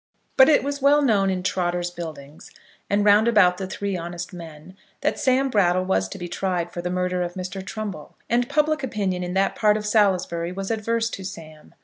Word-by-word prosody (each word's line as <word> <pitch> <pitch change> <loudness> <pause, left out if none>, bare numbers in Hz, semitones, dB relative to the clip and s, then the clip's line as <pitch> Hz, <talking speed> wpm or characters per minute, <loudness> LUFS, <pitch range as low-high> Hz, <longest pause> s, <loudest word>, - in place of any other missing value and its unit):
But 265 +2 +7
it 300 - +4
was 285 0 -3
well 290 +2 +4
known 205 -7 +3
in 185 -1 -2
Trotter's 175 -1 -1
Buildings, 155 -4 -9 0.4
and 205 +1 +1
round 210 +2 +5
about 195 -6 +4
the 190 - -4
Three 200 +1 -3
Honest 175 +1 -6
Men, 165 0 -11 0.3
that 300 +2 0
Sam 265 0 +2
Brattle 185 -3 +2
was 95 - 0
to - - -7
be 175 - -6
tried 175 -1 -2
for 175 - -5
the 180 - -3
murder 180 0 -1
of 175 0 -3
Mr. 185 +1 -5
Trumbull, 200 -6 -7
and 240 +1 +1
public 305 +2 +1
opinion 200 -8 -2
in 180 +1 -4
that 195 +1 +1
part 210 -1 +3
of 210 - -5
Salisbury 185 -5 +1
was 195 +3 -4
adverse 225 +1 0
to 195 - -6
Sam. 160 -5 -10
190 Hz, 205 wpm, -23 LUFS, 175-215 Hz, 0.4 s, But